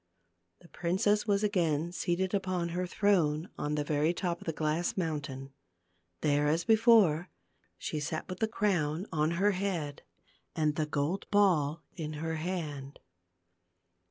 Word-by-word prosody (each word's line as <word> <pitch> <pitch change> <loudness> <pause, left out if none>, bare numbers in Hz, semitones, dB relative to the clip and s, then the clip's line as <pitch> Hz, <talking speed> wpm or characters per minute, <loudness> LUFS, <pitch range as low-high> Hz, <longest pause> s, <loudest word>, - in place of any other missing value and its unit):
The - - -16
princess 195 +6 0
was 200 0 +2
again 170 -5 +1
seated 180 +2 -1
upon 185 -3 -1
her 180 +2 -2
throne 175 -5 +1
on 150 0 -2
the 150 - 0
very 150 +3 +1
top 175 -2 -2
of - - -11
the - - +1
glass 155 +4 -1
mountain. 140 -6 -3 0.7
There 145 0 +2
as 160 +3 +1
before, 215 -7 +5 0.5
she 155 - -3
sat 155 +2 -3
with 185 -1 -6
the 220 - +2
crown 180 -6 0
on 155 0 +1
her 205 +3 +3
head 180 -7 -3 0.5
and 155 -2 +1
the 155 0 -1
gold 150 +6 -2
ball 165 -7 +3
in 155 -2 -4
her 160 +1 -3
hand. 155 -5 -4
170 Hz, 145 wpm, -31 LUFS, 150-190 Hz, 0.7 s, before